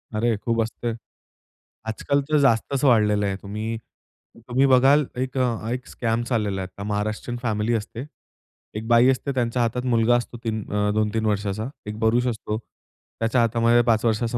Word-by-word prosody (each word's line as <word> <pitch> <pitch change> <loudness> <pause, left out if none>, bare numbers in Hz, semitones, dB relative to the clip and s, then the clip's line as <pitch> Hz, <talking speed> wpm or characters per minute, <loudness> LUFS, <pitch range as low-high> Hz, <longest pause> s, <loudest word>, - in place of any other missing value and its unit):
अरे! 115 +1 +1
खूप 115 +2 0
असते, 115 +1 -4 1.0
आजकाल 140 +6 0
तर 155 - +3
जास्तच 135 +1 +2
वाढलेलं 105 -4 +4
आहे. 95 - -1
तुम्ही 110 +3 -4 0.7
तुम्ही 130 +3 +3
बघाल 135 +3 +5
एक 130 +1 -3
अ, 115 -3 0
एक 125 +1 -4
स्कॅम 115 0 -1
चाललेला 105 -5 -1
आहे. 95 - -4
तर 100 - -6
महाराष्ट्रीयन 105 +3 -3
फॅमिली 110 0 0
असते, 115 +4 -5 0.7
एक 110 +1 -5
बाई 120 +2 +5
असते 135 +2 0
त्यांच्या 120 -1 0
हातात 125 +2 -1
मुलगा 115 +1 +4
असतो 120 0 -3
3 110 -2 -2
अ, 105 0 +1
2-3 110 +1 0
वर्षाचा. 105 +2 -1 0.2
एक 105 +1 -5
पुरुष 120 +3 +2
असतो, 110 -2 -3 0.6
त्याच्या 115 +2 +2
हातामध्ये 115 +1 +3
5 110 +1 +1
वर्षाचा 115 +2 0
115 Hz, 165 wpm, -23 LUFS, 110-120 Hz, 1.0 s, बघाल